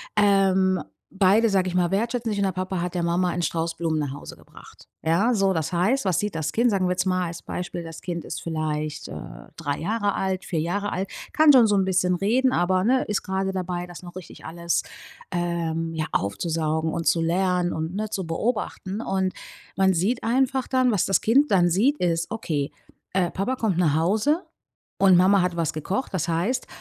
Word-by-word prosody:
Ähm, 190 -2 +3 0.3
beide, 200 +4 +3
sage 190 -2 +1
ich 180 - -5
mal, 175 -1 +2
wertschätzen 230 +3 -1
sich 205 - -2
und - - +2
der 190 - +1
Papa 185 0 -3
hat 180 0 -3
der 175 - 0
Mama 175 +1 +1
einen 175 +1 -2
Strauß 165 0 -1
Blumen 160 -2 -1
nach 145 -3 -2
Hause 145 - -9
gebracht. - - -17
Ja? 195 +10 +2
So 195 -2 +2
das 160 0 -2
heißt, 205 +11 +1
was 185 -5 +1
sieht 210 -4 -2
das 160 -1 -2
Kind? 235 +6 +2
Sagen 195 -4 +1
wir - - 0
jetzt 180 +1 0
mal 185 -1 0
als 170 0 -7
Beispiel: 175 -1 -5
Das 165 -1 -9
Kind 170 -2 -5
ist - - -5
vielleicht, 155 -2 -3
äh, - - -8 0.4
drei 145 -4 -3
Jahre 205 +3 -1
alt, 190 -1 -2
vier 165 - -2
Jahre 200 +6 -2
alt, 190 +1 -3 0.2
kann 310 -2 +6
schon 240 -4 +7
so 210 - +2
'n 195 -1 +2
bisschen 180 -1 +2
reden, 245 +8 +2
aber 185 -1 +2
ne, 255 +3 +3
ist 210 - -2
gerade 190 0 -1
dabei, 180 -1 -3
das 175 +1 -11
noch 175 0 -11
richtig 185 - -10
alles, 170 +1 -1 0.5
ähm, 165 -2 -2
ja 155 -1 -2
aufzusaugen 160 - -1
und 165 -2 -3
zu 165 +2 +3
lernen 180 +1 +1
und 160 +3 -4
ne, 215 0 -2
zu 190 -3 -3
beobachten 205 +1 -2
und 190 -3 -1 0.4
man 190 -1 +4
sieht 200 +9 0
einfach 260 +2 +1
dann, 255 -1 +2
was 205 -5 +1
das 195 - +2
Kind 275 +5 +3
dann 175 -2 +4
sieht, 235 - +2
ist: 165 -1 0
„Okay, 155 -10 -2 0.4
äh, 185 -2 +1
Papa 225 +8 -1
kommt 210 -8 -1
nach 155 -5 +2
Hause 215 - +1 0.6
und 190 -2 +6
Mama 185 +1 +5
hat 180 -1 -1
was 165 -3 0
gekocht. 190 - -3
Das 175 -2 -1
heißt, 175 +10 0
185 Hz, 210 wpm, -24 LUFS, 170-205 Hz, 0.6 s, schon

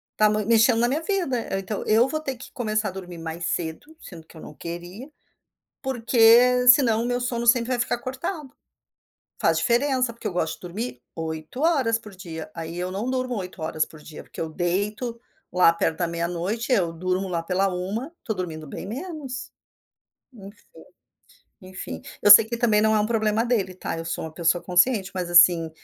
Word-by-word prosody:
tá 215 0 +4
mui 210 -1 0
mexendo 230 +1 +4
na 240 - +3
minha 295 +5 -1
vida, 275 - -1
então 195 +1 -4
eu 225 +4 +4
vou 310 +2 -2
ter 270 -4 -4
que 255 - -11
começar 215 -4 -1
a - - -7
dormir 180 -2 -9
mais 165 +1 -5
cedo, 170 - -4
sendo 165 -3 -12
que 160 - -16
eu - - -11
não 150 - -10
queria, 175 - -8 0.7
porque 250 -1 +4
senão 235 -3 +6
o - - -2
meu 245 0 -1
sono 240 -1 -2
sempre 235 0 +4
vai 245 - 0
ficar 240 - 0
cortado. 270 +3 -6 0.9
Faz - - +2
diferença, 255 -1 +1
porque 235 - -6
eu - - -4
gosto 160 -2 -1
de - - -28
dormir 185 - -5
8 160 - -5
horas 275 -9 +2
por 215 -3 -13
dia, 160 -4 -8
aí 165 +1 -6
eu 180 +1 -3
não 210 +6 -3
durmo 255 -1 -2
8 180 -2 -7
horas 155 0 0
por 155 - -15
dia, 150 0 -11
porque - - -13
eu 165 - -2
deito 205 +8 -2 0.3
lá 180 -2 +5
perto 160 -1 -1
da 175 - 0
meia-noite, 175 +8 -3
eu 180 -9 +2
durmo 185 +3 -2
lá 170 -2 -2
pela 185 +3 0
1, 215 - -4
estou 220 - -4
dormindo 160 -4 -5
bem 140 - -7
menos. 270 - -6 0.8
Enfim. 205 0 -13 1.0
Enfim, 185 - -8 0.2
eu 205 - +8
sei 210 - +11
que 235 +2 -5
também 220 -3 +3
não 220 0 +3
é - - +3
um 210 - +1
problema 220 0 +1
dele 200 -7 0
tá, 180 - -4
eu 165 - -5
sou 165 -1 -4
uma 160 - -9
pessoa 170 +1 +1
consciente, 195 +2 +2
mas 180 -2 -3
assim, 170 -1 +6
210 Hz, 195 wpm, -24 LUFS, 175-245 Hz, 1.0 s, sei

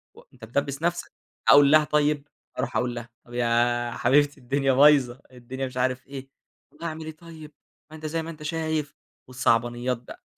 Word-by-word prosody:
و - - -15
أنت 120 -3 -12
بتدبس 140 +4 -2
نفْسَك، 175 +1 -2 0.4
أقول 145 0 +7
لها 155 0 +6
طيب، 150 -1 0 0.3
أروح - - -2
أقول 125 -1 -1
لها 120 0 -7 0.2
طيب 120 - -15
يا 120 0 +1
حبيبتي 145 +2 +2
الدنيا 135 +2 0
بايظة، 135 -2 +4
الدنيا 130 +2 -6
مش 130 0 -8
عارف 130 +1 -1
إيه. 135 -1 -9 0.4
طب - - -23
اعمل 160 -1 -5
إيه 160 - -5
طيب! 160 -3 -12 0.4
ما - - -10
أنت 155 0 -10
زي 165 +1 -2
ما 165 - -7
أنت 155 -2 -9
شايف. 155 -2 -2 0.3
والصعبانيات 120 0 0
بقى 120 - -13
140 Hz, 180 wpm, -25 LUFS, 125-150 Hz, 0.4 s, أقول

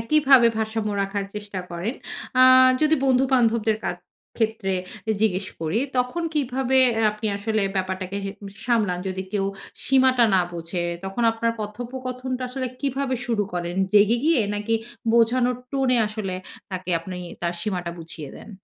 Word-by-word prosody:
একইভাবে 265 -1 +5
ভারসাম্য 220 -1 -1
রাখার 195 0 -2
চেষ্টা 205 -2 -5
করেন। 180 +9 -3 0.5
আ - - +9 0.4
যদি 310 +1 +4
বন্ধু-বান্ধবদের 245 -4 +3
কা - - -1 0.5
ক্ষেত্রে 220 -4 0 0.5
জিজ্ঞেস 190 -3 +1
করি, 160 +6 0 0.2
তখন 250 +8 0
কিভাবে 265 -2 0 0.3
আপনি 215 +1 -5
আসলে 215 0 0
ব্যাপারটাকে 185 0 -2
হে 195 - -3 0.4
সামলান, 215 -7 +1
যদি 190 0 -3
কেউ 195 -2 0 0.4
সীমাটা 260 -2 +4
না 185 - +5
বোঝে? 170 +1 -4 0.2
তখন 195 +5 -3
আপনার 230 +1 0
কথোপকথনটা 255 +3 -5
আসলে 255 0 -3
কীভাবে 275 -1 -1
শুরু 225 -4 +1
করেন? 175 0 -3 0.2
রেগে 210 +3 +5
গিয়ে 320 -5 +4
নাকি 210 +2 -1 0.4
বোঝানোর 240 +2 +3
টোনে 265 -3 +2
আসলে 210 -3 -4 0.4
তাকে 185 -1 -4
আপনি 180 +2 -7 0.3
তার 170 - 0
সীমাটা 180 -5 -3
বুঝিয়ে 160 -3 -8
দেন? - - -12
220 Hz, 140 wpm, -24 LUFS, 190-255 Hz, 0.5 s, আ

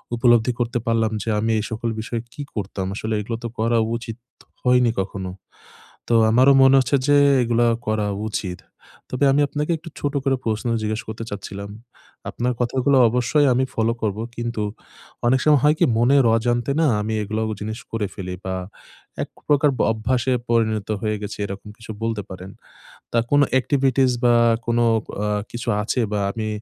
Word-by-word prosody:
উপলব্ধি 120 -1 +4
করতে 120 0 -1
পারলাম 115 -1 +1
যে, - - -4
আমি 110 +2 0
এই - - -2
সকল 115 +1 -2
বিষয়ে 115 +1 -4
কি 145 - -7
করতাম? 100 -2 -3
আসলে 110 +1 -3
এগুলো 115 +2 -4
তো 120 - -2
করা 115 +1 +2 0.2
উচিত 115 -1 -8 0.5
হয়নি 125 -2 +4
কখনো। 95 -1 -5 0.8
তো 120 - +2 0.2
আমারও 130 +5 +6
মনে 135 0 +7
হচ্ছে 130 +2 +1
যে 145 - +5 0.3
এগুলা 120 0 +2 0.2
করা 110 -1 0 0.2
উচিত। 95 -4 -4 0.5
তবে 130 +3 0
আমি 140 - +3
আপনাকে 150 +3 -2
একটু 165 +2 -11
ছোট 145 0 -1
করে 135 -1 +2
প্রশ্ন 110 +1 -2 0.2
জিজ্ঞাসা 110 +1 -2
করতে 110 +1 -5
চাচ্ছিলাম। 100 0 -7 0.6
আপনার 125 +1 -1
কথাগুলো 130 +3 +2
অবশ্যই 125 +5 +2
আমি 130 +2 +2
ফলো 115 +1 +1
করবো। 110 0 -1
কিন্তু 120 -2 -3 0.6
অনেক 130 +2 +3
সময় 150 -3 +5
হয় 150 +1 +5
কি? - - +4
মনের 130 +2 +4
অজানতে 120 +2 0
না? 160 - +4
আমি 110 +1 -2
এগুলো 110 +2 -2 0.2
জিনিস 110 +2 -4
করে 115 -2 -1
ফেলি, 90 -1 -5
বা 95 - -2 0.7
একপ্রকার 145 0 +1
ব - - -5
অভ্যাসে 120 +3 0 0.2
পরিণত 110 -3 +1
হয়ে 110 -1 0
গেছি, 105 - -6
এরকম 100 +1 -8
কিছু 115 -1 -12
বলতে 115 -2 -1
পারেন। 95 +1 -8 0.6
তা - - -5
আর - - -6
কোন 145 0 +5 0.2
এক্টিভিটিস 135 -1 +2
বা 120 -1 +5 0.3
কোন 120 0 0 0.5
আ - - 0 0.2
কিছু 120 0 -6 0.2
আছে 120 +4 -1
বা 105 - 0
আমি 110 0 -4
115 Hz, 170 wpm, -22 LUFS, 110-130 Hz, 0.8 s, মনে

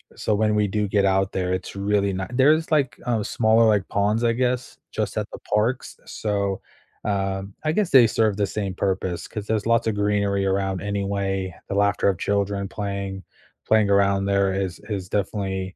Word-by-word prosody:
so 105 - 0
when 105 0 +2
we 105 -1 +2
do 105 +1 -1
get 100 0 +2
out 95 0 +2
there, 90 -1 -1
it's 95 +1 -4
really 100 0 +1
not 95 0 -4
there's, 155 +5 +4
like, 140 -4 +1
uh, 115 -4 0
smaller, 110 +1 +3
like, 105 -3 +2
ponds, 105 +3 +1
I 115 -1 +3
guess? 125 +1 -1
Just - - -3
at - - -1
the - - -8
parks, 110 +5 -1
so, 100 -2 -2 0.4
uh, 95 -1 -1 0.2
I 155 - +1
guess 195 +2 +1
they 125 -4 +8
serve 110 -2 +1
the 100 -1 +1
same 100 -1 -3
purpose, 95 -3 -2
'cause 105 -1 -6
there's 110 -1 0
lots 115 0 +2
of 110 - 0
greenery 100 -1 +1
around 95 -1 0
anyway, 100 -2 -2 0.2
the - - -2
laughter 100 -1 +2
of 95 -3 +2
children 100 -1 -1
playing 100 -1 -4 0.4
playing 110 -2 +4
around 100 0 +3
there 100 -1 +2
is 95 -2 -3
is 95 -3 -4
definitely 95 -2 -2
100 Hz, 185 wpm, -23 LUFS, 95-110 Hz, 0.4 s, they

